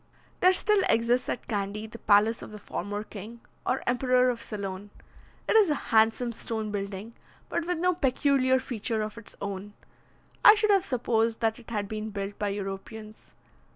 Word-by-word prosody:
There 365 Hz, -, +6 dB
still 415 Hz, +2 st, +3 dB
exists 235 Hz, +2 st, +2 dB
at -, -, -4 dB
Candy 205 Hz, 0 st, -3 dB
the 220 Hz, +1 st, -10 dB
palace 210 Hz, +2 st, +3 dB
of -, -, -8 dB
the 215 Hz, -, -9 dB
former 205 Hz, 0 st, -5 dB
king, 215 Hz, +3 st, -10 dB, 0.3 s
or 255 Hz, -, 0 dB
emperor 250 Hz, 0 st, +3 dB
of 235 Hz, -1 st, -6 dB
Ceylon. 200 Hz, -2 st, -5 dB, 0.6 s
It -, -, +2 dB
is 425 Hz, -5 st, +6 dB
a 300 Hz, -, +2 dB, 0.2 s
handsome 225 Hz, +2 st, +3 dB
stone 220 Hz, -1 st, -3 dB
building, 200 Hz, +2 st, -5 dB, 0.4 s
but 335 Hz, -, -2 dB
with 355 Hz, -1 st, 0 dB
no 360 Hz, +2 st, +2 dB
peculiar 270 Hz, -4 st, +2 dB
feature 225 Hz, -3 st, -2 dB
of 215 Hz, +2 st, -6 dB
its 230 Hz, -, -13 dB
own; 200 Hz, +1 st, -5 dB, 0.7 s
I 425 Hz, -, +10 dB
should 430 Hz, -1 st, +2 dB
have 390 Hz, -2 st, +4 dB
supposed 230 Hz, -, 0 dB
that 225 Hz, 0 st, 0 dB
it 235 Hz, -, -14 dB
had 210 Hz, -3 st, -2 dB
been 215 Hz, +1 st, -4 dB
built 200 Hz, -1 st, -5 dB
by 210 Hz, -, 0 dB
Europeans. 205 Hz, +2 st, -7 dB
225 Hz, 175 wpm, -28 LUFS, 205-255 Hz, 0.7 s, I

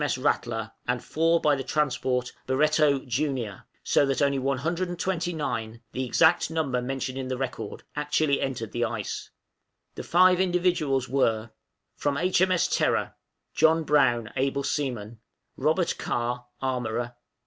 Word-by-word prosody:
M.S. 145 Hz, -3 st, 0 dB
'Rattler,' 120 Hz, -4 st, -1 dB, 0.2 s
and 125 Hz, -1 st, -1 dB
four 165 Hz, +2 st, +2 dB
by 150 Hz, -2 st, +3 dB
the 135 Hz, -, -4 dB
transport 130 Hz, -4 st, 0 dB
'Barretto 150 Hz, +1 st, +3 dB
Junior;' 125 Hz, -5 st, -2 dB, 0.2 s
so -, -, +3 dB
that 135 Hz, -, 0 dB
only 140 Hz, -1 st, +2 dB
one 135 Hz, +1 st, 0 dB
hundred 170 Hz, +6 st, -2 dB
and 175 Hz, -, -5 dB
twenty 175 Hz, -1 st, -1 dB
nine 115 Hz, -8 st, -3 dB
the 130 Hz, -, -2 dB
exact 160 Hz, +7 st, +3 dB
number 145 Hz, -6 st, -1 dB
mentioned 130 Hz, +1 st, -3 dB
in 130 Hz, -, -4 dB
the 130 Hz, 0 st, -2 dB
record 130 Hz, -1 st, -5 dB
actually 150 Hz, -1 st, +1 dB
entered 120 Hz, -5 st, -3 dB
the 120 Hz, -, -1 dB
ice. 115 Hz, -3 st, -3 dB, 0.6 s
The -, -, -6 dB
five 185 Hz, +1 st, +4 dB
invalids 175 Hz, -8 st, +1 dB
were 115 Hz, -4 st, +1 dB, 0.5 s
From 145 Hz, -1 st, 0 dB
H.M.S. 180 Hz, +1 st, +2 dB
'Terror,' -, -, +1 dB, 0.4 s
John 160 Hz, 0 st, +4 dB
Brown, 120 Hz, -7 st, +2 dB
Able 140 Hz, +1 st, 0 dB
seaman. 120 Hz, -7 st, -3 dB, 0.2 s
" -, -, -52 dB
Robert 160 Hz, +3 st, +1 dB
Carr, 120 Hz, +1 st, -2 dB, 0.2 s
Armorer. 120 Hz, -2 st, -2 dB
135 Hz, 150 wpm, -26 LUFS, 125-155 Hz, 0.6 s, five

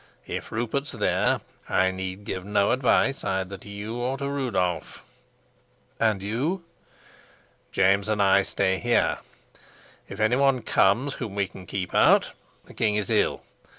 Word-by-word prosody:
If -, -, -6 dB
Rupert's 120 Hz, +5 st, -2 dB
there, -, -, +1 dB, 0.3 s
I 95 Hz, +1 st, +3 dB
need 95 Hz, +1 st, -5 dB
give 95 Hz, -, -4 dB
no 100 Hz, 0 st, +2 dB
advice 130 Hz, +2 st, +2 dB
either 95 Hz, 0 st, -2 dB
to -, -, -13 dB
you 105 Hz, +3 st, -6 dB
or 125 Hz, +2 st, -2 dB
to 140 Hz, +1 st, -3 dB
Rudolf." 100 Hz, -, -2 dB, 0.9 s
"And 110 Hz, -4 st, +1 dB
you?" 140 Hz, -, -2 dB, 1.1 s
"James 100 Hz, +2 st, +2 dB
and 105 Hz, -1 st, 0 dB
I 100 Hz, 0 st, +5 dB
stay 95 Hz, -1 st, 0 dB
here. 120 Hz, 0 st, +1 dB, 0.9 s
If 100 Hz, -, -9 dB
any 110 Hz, +3 st, +3 dB
one 135 Hz, -3 st, +2 dB
comes 115 Hz, +8 st, +2 dB
whom 110 Hz, -6 st, -6 dB
we 100 Hz, -1 st, 0 dB
can 90 Hz, -1 st, -13 dB
keep 90 Hz, -3 st, -4 dB
out, -, -, +5 dB, 0.3 s
the -, -, -14 dB
king 105 Hz, -2 st, +1 dB
is 105 Hz, -2 st, -2 dB
ill. -, -, +1 dB
105 Hz, 150 wpm, -25 LUFS, 95-125 Hz, 1.1 s, I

